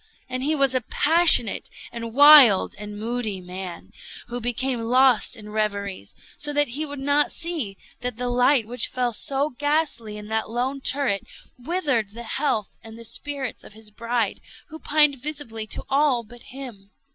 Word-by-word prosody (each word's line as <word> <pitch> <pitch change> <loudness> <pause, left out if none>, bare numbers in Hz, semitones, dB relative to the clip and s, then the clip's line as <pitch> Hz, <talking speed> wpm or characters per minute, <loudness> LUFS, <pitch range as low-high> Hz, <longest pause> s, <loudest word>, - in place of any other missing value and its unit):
And 255 0 -4
he 300 +4 0
was 275 -3 +3
a 255 - +1
passionate, 310 -3 +4 0.2
and 230 -1 -6
wild, 280 -6 +7
and 210 0 -8
moody 220 -2 -4
man, 180 0 -9 0.4
who 245 +1 -4
became 245 +1 -2
lost 250 0 +3
in 210 -1 -11
reveries; 200 - -3 0.2
so 295 0 -1
that 290 -1 +1
he 300 +6 -4
would 285 0 -8
not 285 +2 +1
see 305 - -4 0.2
that 245 -2 -4
the 250 0 -3
light 245 0 +3
which 240 +1 0
fell 250 -2 -2
so 275 +6 -1
ghastly 290 -6 -2
in 210 0 -9
that 220 0 -2
lone 255 +4 -3
turret 265 -8 0 0.4
withered 260 - -1
the 235 +1 -8
health 235 -4 -2
and 225 0 -11
the 230 - -8
spirits 275 +1 -3
of - - -13
his 215 0 -9
bride, 230 -1 -2 0.3
who 315 0 -10
pined 295 -2 +3
visibly 270 -7 -6
to - - -1
all 275 -3 +2
but 240 +2 -15
him. 245 -7 -10
245 Hz, 170 wpm, -23 LUFS, 220-285 Hz, 0.4 s, wild